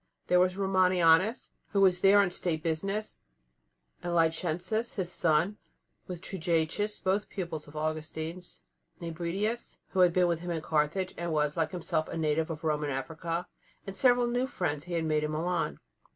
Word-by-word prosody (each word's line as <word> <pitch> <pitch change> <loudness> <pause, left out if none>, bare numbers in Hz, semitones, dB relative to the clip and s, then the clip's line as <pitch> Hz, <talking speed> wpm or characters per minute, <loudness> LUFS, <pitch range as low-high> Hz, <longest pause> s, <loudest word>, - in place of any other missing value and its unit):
There 180 - +4
was 185 +1 +2
Romanianus, 185 +1 +3 0.2
who 200 - +3
was 185 -2 +4
there 200 +1 +7
on 185 -3 +1
State 165 -3 -2
business, 195 +6 -2 0.8
and 175 0 -2
Licentius, 175 +7 0
his 180 -3 -2
son, 170 +5 +1 0.5
with 180 -2 -6
Trigetius, 180 +3 -1
both 195 +2 0
pupils 170 -5 -5
of 145 - -14
Augustine's; 155 +3 -4 0.4
Nebridius, 175 +7 -3
who 190 - -2
had 180 -1 +6
been 180 +1 +3
with 170 -2 +1
him 175 +1 -6
in 165 -2 -2
Carthage, 160 +5 0
and 170 -1 -2
was, 150 -1 +1
like 165 -2 0
himself, 160 -3 -2
a - - -5
native 160 0 +1
of 160 -1 -6
Roman 150 -2 0
Africa; 160 +5 -3 0.4
and 195 - -2
several 245 +1 +5
new 245 +2 0
friends 150 - -2
he 175 - -6
had 165 -1 0
made 155 -1 +1
in 150 - -1
Milan. 160 - -1
170 Hz, 165 wpm, -30 LUFS, 160-190 Hz, 0.8 s, there